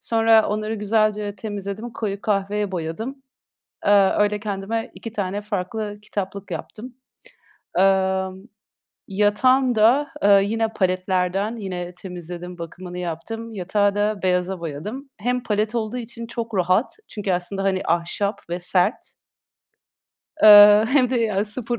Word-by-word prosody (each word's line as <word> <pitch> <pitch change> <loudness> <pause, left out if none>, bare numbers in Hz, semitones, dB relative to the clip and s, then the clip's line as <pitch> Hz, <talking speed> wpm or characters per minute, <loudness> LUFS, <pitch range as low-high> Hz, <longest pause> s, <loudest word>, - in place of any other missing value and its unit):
Sonra 225 -1 +4
onları 215 +1 -2
güzelce 210 -1 0
temizledim, 205 +3 -6
koyu 200 -3 -4
kahveye 205 -1 -1
boyadım. 220 - -5 0.6
Iıı, 200 -1 +5
öyle 210 0 +2
kendime 210 +2 -4
2 230 - -8
tane 200 -1 -3
farklı 205 +1 -4
kitaplık 200 -1 -5
yaptım. 225 +9 -7 0.8
Imm, 190 0 +1 0.6
yatağım 235 +6 +3
da, 245 +7 +4 0.2
ııı, 200 -1 +6
yine 225 +3 0
paletlerden. 185 +2 0
Yine 180 -5 -6
temizledim, 180 -1 -8
bakımını 175 +2 -8
yaptım. 180 +7 -5
Yatağı 200 +1 0
da 205 0 0
beyaza 180 0 0
boyadım. 200 - -6
Hem 250 +3 -1
palet 215 +2 -1
olduğu 225 +1 -2
için 235 -1 -7
çok 230 -2 -5
rahat 185 +6 +2 0.2
çünkü 205 -3 -3
aslında, 180 +2 -2
hani, 190 -1 +1
ahşap 175 +5 -1
ve 175 +1 -3
sert. 180 +4 0 1.3
Iıı, 210 0 +9
hem 255 0 +3
de 255 - +1
ya 210 -3 +1
0 235 +2 -4
205 Hz, 125 wpm, -22 LUFS, 185-220 Hz, 1.3 s, Iıı